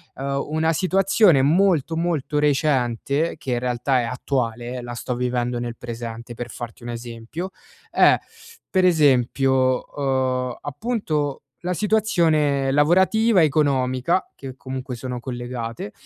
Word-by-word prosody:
Uhm, 140 Hz, +1 st, -2 dB
una 160 Hz, +1 st, +1 dB
situazione 190 Hz, -2 st, +3 dB
molto, 165 Hz, +1 st, +2 dB
molto 160 Hz, -4 st, -1 dB
recente, 145 Hz, 0 st, +1 dB
che 130 Hz, -, -3 dB
in 120 Hz, -, 0 dB
realtà 125 Hz, +1 st, 0 dB
è -, -, -2 dB
attuale, 125 Hz, 0 st, -3 dB
la 120 Hz, 0 st, -6 dB
sto 120 Hz, +1 st, -4 dB
vivendo 125 Hz, 0 st, -1 dB
nel 120 Hz, -1 st, -4 dB
presente 115 Hz, 0 st, -7 dB
per 120 Hz, 0 st, -6 dB
farti 120 Hz, 0 st, -8 dB
un 120 Hz, -, -6 dB
esempio, 120 Hz, +9 st, -6 dB, 0.4 s
è -, -, +5 dB, 0.5 s
per 185 Hz, -1 st, +2 dB
esempio, 130 Hz, -4 st, +3 dB
uhm, 130 Hz, -2 st, 0 dB
appunto 150 Hz, -, -2 dB, 0.2 s
la 180 Hz, +1 st, -1 dB
situazione 165 Hz, -10 st, +2 dB
lavorativa, 185 Hz, +7 st, +4 dB
economica, 140 Hz, +2 st, +1 dB
che 130 Hz, -2 st, -9 dB
comunque 130 Hz, -1 st, -6 dB
sono 125 Hz, +1 st, -5 dB
collegate. 120 Hz, -3 st, -5 dB
135 Hz, 125 wpm, -22 LUFS, 120-160 Hz, 0.5 s, è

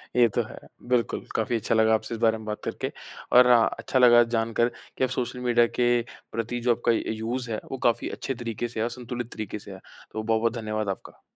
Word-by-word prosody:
ये 120 Hz, -1 st, +6 dB
तो -, -, +3 dB
है। -, -, -11 dB, 0.3 s
बिल्कुल 125 Hz, -2 st, +1 dB
काफ़ी 110 Hz, +2 st, 0 dB
अच्छा 115 Hz, -, 0 dB
लगा 110 Hz, 0 st, +4 dB
आपसे 110 Hz, +1 st, -1 dB
इस -, -, -8 dB
बारे 110 Hz, -1 st, +3 dB
में 110 Hz, -, -10 dB
बात 105 Hz, 0 st, -4 dB
करके -, -, -3 dB, 0.4 s
और 125 Hz, 0 st, +8 dB
हाँ, 120 Hz, -2 st, +6 dB
अच्छा 130 Hz, -, 0 dB
लगा 120 Hz, -1 st, +8 dB
जानकर 115 Hz, 0 st, +1 dB, 0.3 s
कि -, -, 0 dB
आप 130 Hz, -, +2 dB
सोशल 125 Hz, -1 st, -3 dB
मीडिया 120 Hz, -1 st, +3 dB
के 120 Hz, -, +4 dB, 0.4 s
प्रति 115 Hz, +2 st, -3 dB
जो 120 Hz, 0 st, +3 dB
आपका 120 Hz, 0 st, +1 dB
अ, -, -, +3 dB
यूज़ 115 Hz, +3 st, -3 dB
है 110 Hz, -, -2 dB
वो 135 Hz, -, -3 dB
काफ़ी 115 Hz, -, 0 dB
अच्छे 135 Hz, -, -3 dB
तरीके 120 Hz, -1 st, -4 dB
से 115 Hz, -1 st, -7 dB
है -, -, +1 dB
और 115 Hz, -, 0 dB
संतुलित 120 Hz, 0 st, -6 dB
तरीके 105 Hz, -1 st, -5 dB
से 100 Hz, -, -11 dB
है। 95 Hz, -, -8 dB, 0.3 s
तो 110 Hz, 0 st, -4 dB
बहुत-बहुत 115 Hz, +1 st, +1 dB
धन्यवाद 110 Hz, -1 st, -2 dB
आपका। 95 Hz, -, -7 dB
115 Hz, 230 wpm, -26 LUFS, 110-120 Hz, 0.4 s, और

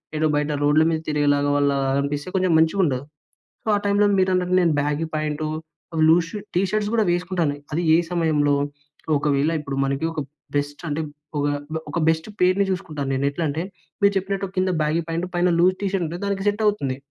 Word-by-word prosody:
ఏదో 155 Hz, +1 st, +1 dB
బయట 150 Hz, +1 st, 0 dB
రోడ్ల 150 Hz, +2 st, +4 dB
మీద 160 Hz, -1 st, 0 dB
తిరిగినలా 145 Hz, -1 st, +2 dB, 0.2 s
వాళ్ళలాగా 140 Hz, -1 st, +1 dB
అనిపిస్తే 145 Hz, +3 st, -3 dB
కొంచెం 185 Hz, -1 st, +2 dB
మంచిగా 160 Hz, +5 st, +3 dB
ఉండదు. 130 Hz, -4 st, 0 dB, 0.6 s
సో, -, -, -14 dB
ఆ -, -, +3 dB
టైంలో 205 Hz, +1 st, +3 dB
మీరన్నట్టు 185 Hz, -1 st, +1 dB
నేను 170 Hz, -3 st, +3 dB
బ్యాగీ 150 Hz, +2 st, 0 dB
ప్యాంటు 155 Hz, 0 st, -2 dB, 0.6 s
లూస్ 165 Hz, 0 st, +4 dB, 0.3 s
టీషర్ట్స్ 205 Hz, +3 st, 0 dB
కూడా 225 Hz, -2 st, +3 dB
వేసుకుంటాను. 175 Hz, -4 st, 0 dB, 0.2 s
అది 170 Hz, -, 0 dB
ఏ -, -, +6 dB
సమయంలో 155 Hz, -4 st, +2 dB, 0.6 s
ఒకవేళ 145 Hz, +1 st, +1 dB
ఇప్పుడు 140 Hz, -2 st, -5 dB
మనకి 140 Hz, +3 st, -1 dB
ఒక 155 Hz, -2 st, -3 dB, 0.4 s
బెస్ట్ 145 Hz, +3 st, -3 dB
అంటే, 150 Hz, +2 st, -1 dB, 0.4 s
ఒక -, -, 0 dB, 0.5 s
ఒక 170 Hz, -, -3 dB
బెస్ట్ 160 Hz, +4 st, 0 dB
పెయిర్‌ని 185 Hz, +2 st, +3 dB
చూసుకుంటాను 155 Hz, -7 st, -3 dB
నేను 140 Hz, +1 st, 0 dB
ఎట్లంటే, 155 Hz, +1 st, -2 dB, 0.4 s
మీరు 200 Hz, 0 st, +5 dB
చెప్పినట్టు 195 Hz, 0 st, -2 dB
కింద 185 Hz, 0 st, +2 dB
బ్యాగీ 155 Hz, +3 st, +1 dB
ప్యాంట్ 170 Hz, +2 st, -2 dB
పైన 175 Hz, +1 st, +3 dB
లూజ్ 185 Hz, +2 st, +4 dB
టీషర్ట్ 195 Hz, -3 st, 0 dB
ఉంటే, 170 Hz, +3 st, -6 dB
దానికి 200 Hz, 0 st, -2 dB
సెట్ 210 Hz, +2 st, -2 dB
అవుతుంది. 140 Hz, -11 st, 0 dB
160 Hz, 170 wpm, -23 LUFS, 145-185 Hz, 0.6 s, ఏ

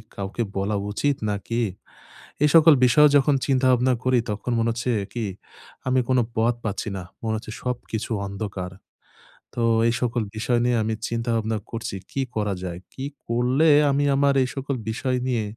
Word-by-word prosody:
কাউকে 100 Hz, +4 st, -3 dB
বলা 100 Hz, +2 st, 0 dB, 0.2 s
উচিত 145 Hz, +7 st, +1 dB, 0.2 s
নাকি? 115 Hz, +4 st, -2 dB, 0.8 s
এই 150 Hz, -, +5 dB
সকল 160 Hz, -1 st, +8 dB
বিষয়ও 150 Hz, +4 st, +6 dB
যখন 140 Hz, +1 st, +3 dB
চিন্তা-ভাবনা 130 Hz, -1 st, +3 dB
করি, 130 Hz, -1 st, +3 dB
তখন 105 Hz, +4 st, -4 dB
মনে 115 Hz, +1 st, +1 dB
হচ্ছে 120 Hz, +2 st, -2 dB, 0.2 s
কি, 120 Hz, -2 st, -2 dB, 0.6 s
আমি 130 Hz, 0 st, +3 dB
কোনো 130 Hz, -1 st, +4 dB, 0.2 s
পথ 115 Hz, +2 st, +3 dB
পাচ্ছি 105 Hz, +1 st, -2 dB
না। 90 Hz, -, -5 dB, 0.2 s
মনে 110 Hz, -1 st, 0 dB
হচ্ছে 110 Hz, -, -8 dB
সবকিছু 120 Hz, -3 st, -4 dB
অন্ধকার। 100 Hz, -2 st, -5 dB, 0.8 s
তো 120 Hz, -, -2 dB, 0.3 s
এই 115 Hz, -, +2 dB
সকল 120 Hz, -1 st, 0 dB
বিষয় 120 Hz, +2 st, +1 dB
নিয়ে 120 Hz, -1 st, +2 dB
আমি 110 Hz, +1 st, -1 dB, 0.2 s
চিন্তা 115 Hz, 0 st, -2 dB
ভাবনা 110 Hz, 0 st, -1 dB
করছি, 115 Hz, -4 st, -4 dB, 0.2 s
কি 135 Hz, -, -1 dB
করা 105 Hz, -2 st, 0 dB
যায়, 90 Hz, -1 st, -5 dB
কি 135 Hz, -, -5 dB, 0.2 s
করলে 125 Hz, +7 st, +2 dB, 0.2 s
আমি 145 Hz, +1 st, +1 dB
আমার 140 Hz, 0 st, +3 dB
এই 130 Hz, -, -2 dB
সকল 135 Hz, 0 st, -3 dB
বিষয় 125 Hz, +3 st, -1 dB
নিয়ে 120 Hz, -4 st, 0 dB
120 Hz, 165 wpm, -24 LUFS, 110-130 Hz, 0.8 s, সকল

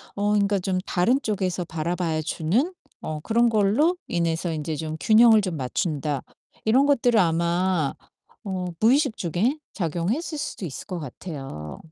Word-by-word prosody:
어 205 Hz, +1 st, 0 dB
그러니까 205 Hz, -1 st, +2 dB
좀 185 Hz, 0 st, -1 dB
다른 235 Hz, +9 st, +2 dB
쪽에서 185 Hz, -5 st, -1 dB
바라봐 165 Hz, 0 st, -2 dB
주는 215 Hz, -, 0 dB, 0.3 s
어 155 Hz, -1 st, -4 dB
그런 235 Hz, +4 st, +3 dB
걸로 230 Hz, -, +3 dB
인해서 170 Hz, 0 st, -1 dB
인제 155 Hz, 0 st, -3 dB
좀 155 Hz, 0 st, -4 dB
균형을 220 Hz, +3 st, +6 dB
좀 180 Hz, -5 st, -3 dB
맞춘다.' 145 Hz, +1 st, -2 dB, 0.4 s
이런 255 Hz, +6 st, +4 dB
것들을 245 Hz, -5 st, +3 dB
아마 170 Hz, -2 st, +1 dB, 0.5 s
어 185 Hz, -2 st, -3 dB
무의식 260 Hz, +2 st, +3 dB
중에 195 Hz, -, 0 dB, 0.2 s
작용했을 195 Hz, -, -2 dB
수도 285 Hz, -9 st, -4 dB
있을 140 Hz, -, -7 dB
것 180 Hz, -3 st, -4 dB
같아요. 135 Hz, -, -7 dB
185 Hz, 295 characters per minute, -24 LUFS, 160-220 Hz, 0.5 s, 균형을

